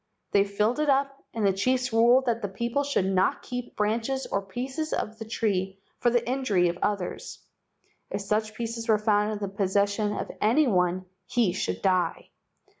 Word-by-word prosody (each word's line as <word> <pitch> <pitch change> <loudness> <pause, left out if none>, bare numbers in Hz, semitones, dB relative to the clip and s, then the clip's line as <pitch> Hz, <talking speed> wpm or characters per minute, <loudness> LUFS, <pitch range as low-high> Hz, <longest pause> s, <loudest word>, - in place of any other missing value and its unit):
They 200 0 +4
filled 210 +6 0
it 305 -1 +1
up 275 0 +1
and 225 -3 -1
the 195 - +4
chiefs 255 +5 0
ruled 240 +3 +5
that 235 -2 0
the 205 - -1
people 235 +8 -1
should 280 -9 0
not 190 0 +1
keep 245 -1 -6
branches 225 +5 0
or 200 - -1
pieces 260 +10 -4
of 220 +1 -3
the 225 - -6
tree 195 -4 -1 0.2
for 240 - +3
the 240 0 +1
injury 225 -9 +2
of 175 +1 -5
others. 200 -4 -2 0.7
If - - -3
such 215 +2 -1
pieces 230 0 -4
were 215 - +5
found 210 0 +2
in - - -3
the 205 -1 -3
pos¬ 195 -2 0
session 205 +1 +1
of - - -4
any 240 +9 +4
one 185 -4 +1 0.2
he 230 -8 +2
should - - -3
die. 185 -3 0
215 Hz, 190 wpm, -27 LUFS, 200-245 Hz, 0.7 s, ruled